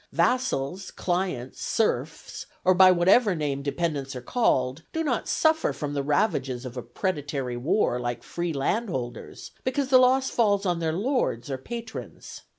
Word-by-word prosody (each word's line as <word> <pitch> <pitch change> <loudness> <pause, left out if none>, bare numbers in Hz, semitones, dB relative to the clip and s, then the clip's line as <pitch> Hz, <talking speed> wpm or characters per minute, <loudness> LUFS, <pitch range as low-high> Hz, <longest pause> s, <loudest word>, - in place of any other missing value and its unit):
Vassals, 195 - 0
clients, 175 -9 -3
serfs, - - -2 0.2
or 185 - +6
by 185 +1 +7
whatever 185 +4 +4
name 145 -3 -2
dependents 140 -2 -2
are 125 - -5
called, 130 - +1
do 325 - -1
not 260 -7 -1
suffer 320 0 +2
from 145 -2 -4
the 140 - 0
ravages 140 - 0
of 125 -1 -7
a 125 - -4
predatory 140 - -3
war 125 - +1
like 120 -1 -4
free 175 0 -3
landholders, 140 - -3
because 265 +1 -1
the 260 -1 +7
loss 260 +1 +3
falls 205 -4 +2
on 175 -2 0
their 160 -1 0
lords 190 - -1
or 130 - -3
patrons. 230 - -8
170 Hz, 155 wpm, -26 LUFS, 135-225 Hz, 0.2 s, by